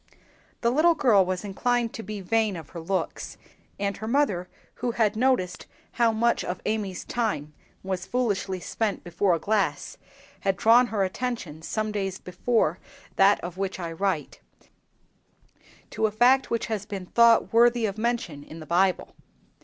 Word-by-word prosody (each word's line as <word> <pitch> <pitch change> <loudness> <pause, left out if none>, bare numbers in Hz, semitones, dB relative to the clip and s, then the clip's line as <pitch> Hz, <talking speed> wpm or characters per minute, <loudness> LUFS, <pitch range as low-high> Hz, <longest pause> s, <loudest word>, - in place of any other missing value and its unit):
The 235 - +2
little 325 +6 +4
girl 220 -10 +4
was 185 +1 -3
inclined 235 +4 0
to - - -6
be 215 -2 -6
vain 215 +1 +1
of 160 -4 -9
her 170 - -7
looks, 185 +3 -3 0.4
and 200 0 -1
her 220 - -6
mother, 220 -9 +1 0.2
who 240 -1 -3
had 215 -2 +1
noticed 225 -7 0 0.2
how 235 -2 +2
much 235 +2 +1
of 180 - -3
her - - -25
Amy's 205 -4 -2
time 155 - -2 0.3
was 190 0 -4
foolishly 200 -5 -1
spent 210 +4 -2
before 175 +1 +1
a - - -4
glass, 210 +1 -1 0.4
had 195 -1 0
drawn 235 +4 +5
her 210 -4 0
attention, 190 -6 -4
some 215 +5 -2
days 195 -2 -2
before 180 -2 0 0.4
that 195 +1 +5
of 175 +1 -7
which 195 -1 -3
I 170 -2 -4
write, 165 -4 -2 1.5
to 220 - +1
a - - -4
fact 250 +5 +4
which 230 -1 -1
has 210 -3 -4
been 195 -3 -5
thought 235 +4 +4
worthy 235 0 +4
of 205 0 -3
mention 230 - -2
in 160 +2 -11
the 155 - -9
Bible. 180 +3 +1
205 Hz, 165 wpm, -26 LUFS, 185-235 Hz, 1.5 s, drawn